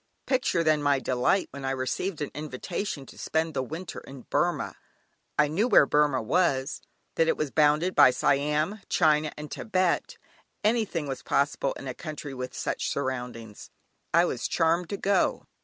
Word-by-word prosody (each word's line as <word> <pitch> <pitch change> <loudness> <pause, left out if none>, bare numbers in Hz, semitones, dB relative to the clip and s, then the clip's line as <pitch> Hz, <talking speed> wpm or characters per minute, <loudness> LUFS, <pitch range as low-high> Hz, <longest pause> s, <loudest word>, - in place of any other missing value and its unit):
Picture 255 -10 +1
then 155 -2 +3
my 145 -1 +3
delight 130 +9 +1
when 140 -1 -8
I 135 - -1
received 135 +7 -2
an 145 - -3
invitation 150 +2 -4
to - - -14
spend 160 0 -1
the 135 - 0
winter 165 +7 -6
in 135 -2 -12
Burmah. - - 0 0.6
I 150 - +5
knew 185 +11 +1
where 150 - +6
Burmah 145 -4 +2
was; 135 -1 +1 0.3
that 165 - +2
it - - +2
was 155 -3 -2
bounded 155 +4 +3
by - - +8
Siam, 150 +9 +1
China, 155 -2 +3
and 150 0 -8
Tibet; 185 -5 0 0.5
anything 215 -8 +1
was 135 -1 -4
possible 140 -1 0
in 135 - -9
a 130 - -3
country 150 -1 -7
with 125 -1 -6
such - - -2
surroundings. 125 -5 -4 0.4
I - - +5
was - - -2
charmed 165 +1 +1
to 200 - -3
go. 200 0 +1
150 Hz, 165 wpm, -27 LUFS, 135-170 Hz, 0.6 s, by